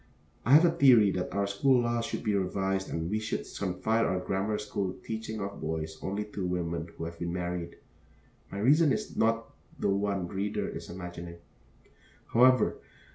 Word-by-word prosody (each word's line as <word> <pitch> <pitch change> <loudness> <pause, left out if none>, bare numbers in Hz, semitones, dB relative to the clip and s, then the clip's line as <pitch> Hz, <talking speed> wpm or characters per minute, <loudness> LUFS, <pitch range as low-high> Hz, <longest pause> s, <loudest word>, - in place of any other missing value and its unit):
I 130 - +5
have 155 +4 +8
a 170 - +4
theory 125 - +6
that 90 -1 -3
our 100 0 +1
school 120 +6 +3
laws 120 0 0
should - - -4
be 105 -2 +1
revised 95 0 -1
and 80 - -2
that 85 - -3
we 110 - +1
should 110 - -3
confide 100 +4 0
our 95 - +1
grammar 100 +3 -1
school 100 -3 -3
teaching 110 -1 -5
of 100 0 -5
boys 80 0 -4
only 100 +2 -2
to 105 -2 -6
women 85 -2 -2
who 80 - -4
have 85 0 -8
been 85 0 -2
married. 90 -1 -3 0.8
My 100 - -5
reason 145 +8 +4
is 215 +7 -2
not 115 0 +1 0.3
the - - 0
one 100 -1 0
the - - -11
reader 100 +2 -1
is - - -7
imagining, 85 -1 -7 1.0
however. 130 +2 +5
100 Hz, 185 wpm, -29 LUFS, 90-110 Hz, 1.0 s, have